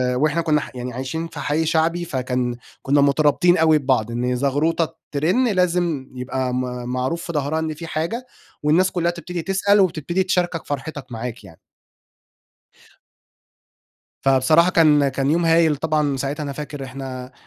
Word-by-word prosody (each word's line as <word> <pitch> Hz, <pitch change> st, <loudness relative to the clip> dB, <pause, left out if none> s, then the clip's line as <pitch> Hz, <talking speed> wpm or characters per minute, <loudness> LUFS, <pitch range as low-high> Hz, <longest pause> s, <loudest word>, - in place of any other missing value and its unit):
وإحنا 155 Hz, +5 st, +1 dB
كنّا 155 Hz, -2 st, +2 dB
يعني 125 Hz, 0 st, -5 dB
عايشين 135 Hz, +7 st, -4 dB
في -, -, -10 dB
حي 155 Hz, +2 st, 0 dB
شعبي 165 Hz, +2 st, +1 dB
فكان 125 Hz, -4 st, -2 dB, 0.3 s
كنّا 140 Hz, +1 st, +2 dB
مترابطين 150 Hz, +5 st, +3 dB
أوي 160 Hz, -1 st, +5 dB
ببعض، 130 Hz, -5 st, 0 dB
إن 125 Hz, +1 st, -1 dB
زغروطة 150 Hz, +5 st, 0 dB, 0.2 s
ترن 180 Hz, -, +2 dB
لازم 175 Hz, -, 0 dB
يبقى 125 Hz, 0 st, -3 dB
م 125 Hz, -, 0 dB, 0.3 s
معروف 130 Hz, +7 st, -2 dB
في 170 Hz, -, -5 dB
ضهرها 150 Hz, +1 st, -1 dB
إن 160 Hz, -1 st, -2 dB
في 165 Hz, +2 st, -8 dB
حاجة، 170 Hz, +12 st, -3 dB, 0.4 s
والناس 175 Hz, +5 st, +3 dB
كلها 170 Hz, -1 st, 0 dB
تبتدي 175 Hz, 0 st, -6 dB
تسأل 195 Hz, +3 st, +2 dB
وتبتدي 175 Hz, 0 st, +1 dB
تشاركك 180 Hz, -3 st, -1 dB
فرحتِك 145 Hz, -1 st, -5 dB
معاك 115 Hz, 0 st, -6 dB
يعني. 85 Hz, -5 st, -15 dB, 2.6 s
فبصراحة 135 Hz, +6 st, +4 dB
كان 150 Hz, -4 st, +4 dB
كان 135 Hz, +1 st, -1 dB
يوم 170 Hz, +1 st, +2 dB
هايل 165 Hz, -2 st, +4 dB
طبعًا 150 Hz, -2 st, 0 dB
ساعتها 140 Hz, +3 st, -3 dB
أنا 140 Hz, -1 st, -4 dB
فاكر 145 Hz, -1 st, -6 dB
إحنا 130 Hz, -1 st, -7 dB
150 Hz, 150 wpm, -21 LUFS, 135-170 Hz, 2.6 s, أوي